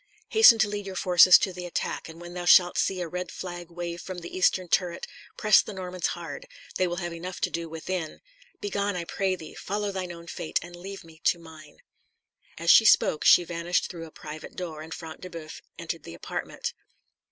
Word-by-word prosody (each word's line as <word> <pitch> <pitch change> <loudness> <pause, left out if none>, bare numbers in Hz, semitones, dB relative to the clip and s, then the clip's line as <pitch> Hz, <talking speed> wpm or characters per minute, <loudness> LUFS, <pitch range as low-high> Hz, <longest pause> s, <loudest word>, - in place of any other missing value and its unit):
Hasten 440 - +8
to 220 -1 +3
lead 205 -1 -5
your 190 - -6
forces 180 0 +7
to 190 - -2
the 180 0 -6
attack, 170 - -3
and 160 +1 -11
when 175 0 -9
thou 175 0 -5
shalt 175 0 +6
see 185 -1 0
a 175 - -3
red 180 +2 -5
flag 175 -2 -7
wave 170 0 -5
from 185 -1 -7
the 170 -1 -8
eastern 185 0 +2
turret, 175 0 0 0.3
press 215 0 +6
the 215 - -8
Normans 185 -1 -3
hard; - - -8 0.3
they 185 - +2
will 175 - -3
have 175 -1 -4
enough 180 +2 -6
to - - 0
do 165 -1 -4
within. 165 0 -4 0.4
Begone, 200 -1 -2
I 175 - -2
pray 190 +2 -1
thee; 160 -3 -10
follow 205 +1 -3
thine 185 -2 -4
own 170 -1 -10
fate, 165 -2 -3
and 175 0 -10
leave 195 +2 -8
me 165 -1 -17
to - - +4
mine." 160 -3 -14 0.8
As 170 +1 +4
she - - +8
spoke 160 -7 +4
she 175 - +7
vanished 170 +1 -1
through 165 -2 -8
a - - -15
private 155 +1 -9
door, 165 -4 -6
and 160 +1 -10
Front 160 -1 -8
de 185 - -7
Boeuf 165 -3 -9 0.2
entered - - -5
the - - -10
apartment. - - -5
175 Hz, 210 wpm, -27 LUFS, 170-185 Hz, 0.8 s, Hasten